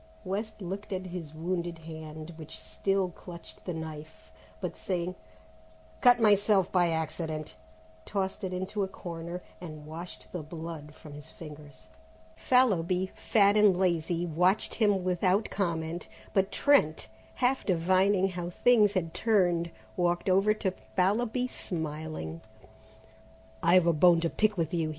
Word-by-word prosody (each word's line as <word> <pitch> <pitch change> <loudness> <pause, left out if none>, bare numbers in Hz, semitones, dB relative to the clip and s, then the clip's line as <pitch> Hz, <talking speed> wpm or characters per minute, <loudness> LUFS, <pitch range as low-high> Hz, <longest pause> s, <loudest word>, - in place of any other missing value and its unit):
West 210 +2 -4
looked 200 +4 -5
at 185 -1 -3
his 175 -4 -6
wounded 170 +1 -2
hand, 160 0 -8
which 160 -1 -9
still 195 -2 -1
clutched 170 -1 -12
the 180 - -3
knife, 160 -1 -8 0.3
but - - -4
saying, 180 -1 -2 0.9
"Cut 245 -1 +7
myself 205 -3 +4
by 175 -2 +3
accident," 160 -1 -3 0.5
tossed 190 - -3
it 185 - -2
into 185 +3 -3
a 195 - +1
corner 170 -1 -7 0.2
and 155 -4 -8
washed 165 +3 -8
the 175 - -4
blood 160 -1 -8
from 150 - -12
his 150 +2 -11
fingers. 150 -5 -12 0.5
Fallowby, 190 -7 +2
fat 205 -2 +3
and 210 -4 +5
lazy, 175 -1 +1
watched 180 +5 +2
him 205 -4 +2
without 185 +3 +1
comment, 170 -3 -2 0.3
but 195 0 +2
Trent, 215 - +3 0.3
half 255 +1 +1
divining 185 +2 +3
how 175 -1 -4
things 210 +1 +4
had 165 -4 -1
turned, 180 -5 +2 0.3
walked 175 0 0
over 195 +3 +4
to 195 -3 -1 0.2
Fallowby 220 +6 +2
smiling. 155 - -5 1.2
"I've 175 +1 +5
a 170 - +4
bone 170 +2 +6
to 165 - 0
pick 215 -1 +1
with 165 -1 -1
you!" 165 -2 0
180 Hz, 135 wpm, -29 LUFS, 160-195 Hz, 1.2 s, Cut